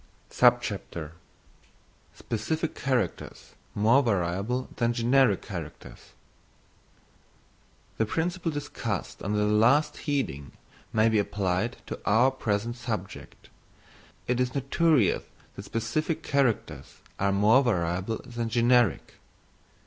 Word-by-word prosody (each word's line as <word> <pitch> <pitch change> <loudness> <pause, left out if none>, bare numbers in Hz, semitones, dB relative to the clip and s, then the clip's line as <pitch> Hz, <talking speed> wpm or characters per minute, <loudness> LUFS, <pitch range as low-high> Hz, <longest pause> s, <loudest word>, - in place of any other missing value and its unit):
Specific 155 +9 -3
Characters 130 -3 -3 0.2
more 115 +7 +4
Variable 100 +3 -1
than 120 0 +1
Generic 125 +3 +3
Characters. 85 -7 -9 1.9
The 110 - +2
principle 170 - -1
discussed 135 - -4
under 105 +2 -1
the 105 - +2
last 115 +8 +2
heading 70 - -2 0.4
may 110 0 +3
be 110 -1 +3
applied 100 +3 -1
to - - -6
our 120 +6 +4
present 115 -2 -2
subject. 110 -6 -6 0.8
It 125 0 0
is 125 +1 -1
notorious 140 - +2 0.3
that - - -8
specific 155 +9 -2
characters 135 -6 -1 0.2
are 100 0 +2
more 105 +7 +4
variable 95 -1 -1
than 120 -2 -4
generic. 120 -2 +2
115 Hz, 95 wpm, -27 LUFS, 105-130 Hz, 1.9 s, more